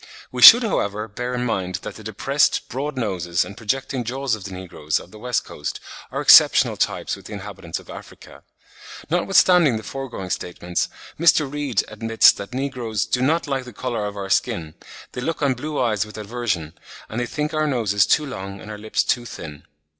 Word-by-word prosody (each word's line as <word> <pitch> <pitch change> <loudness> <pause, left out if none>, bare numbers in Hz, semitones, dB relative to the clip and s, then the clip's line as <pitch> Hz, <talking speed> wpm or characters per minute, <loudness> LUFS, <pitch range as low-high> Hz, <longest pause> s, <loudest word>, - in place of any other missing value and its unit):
We 125 - -4
should, 240 - +11
however, 105 - -1
bear 125 +4 -4
in 125 0 -2
mind 95 -6 -2
that - - -6
the 110 - -12
depressed, 130 +7 0
broad 135 +3 -4
noses 90 -7 -1
and 100 - -10
projecting 130 +3 -2
jaws 130 +2 -2
of 105 -3 -4
the 100 - -7
negroes 85 -5 -3
of 90 - -14
the 110 - -13
West 125 +1 -1
Coast 75 - -6 0.3
are - - -3
exceptional - - +7
types - - -1
with - - -15
the - - -9
inhabitants - - -6
of - - -13
Africa. - - -12 0.7
Notwithstanding 175 -6 +4
the 110 - -8
foregoing 125 -10 -6
statements, 90 0 -3 0.3
Mr. 165 -1 +5
Reade 145 -7 -1
admits 115 +1 +4
that 100 +2 -9
negroes 125 -5 -2
"do 125 - -1
not 160 +6 +1
like 135 -3 -2
the 125 - -11
colour 115 -1 -3
of 105 0 -7
our 95 -1 -5
skin; 80 -2 0 0.4
they 125 - -6
look 160 +3 -3
on 140 -2 +3
blue 150 +4 -4
eyes 110 -5 +1
with 105 0 -11
aversion, 105 -8 -3 0.3
and 110 - -5
they 120 - -2
think 150 +3 -3
our 155 0 +1
noses 105 -7 +2
too 150 - +3
long 100 -7 -7
and 110 - -9
our 105 - -8
lips 110 +1 0
too 120 -1 0
thin." 75 -8 -9
115 Hz, 195 wpm, -22 LUFS, 100-135 Hz, 0.7 s, should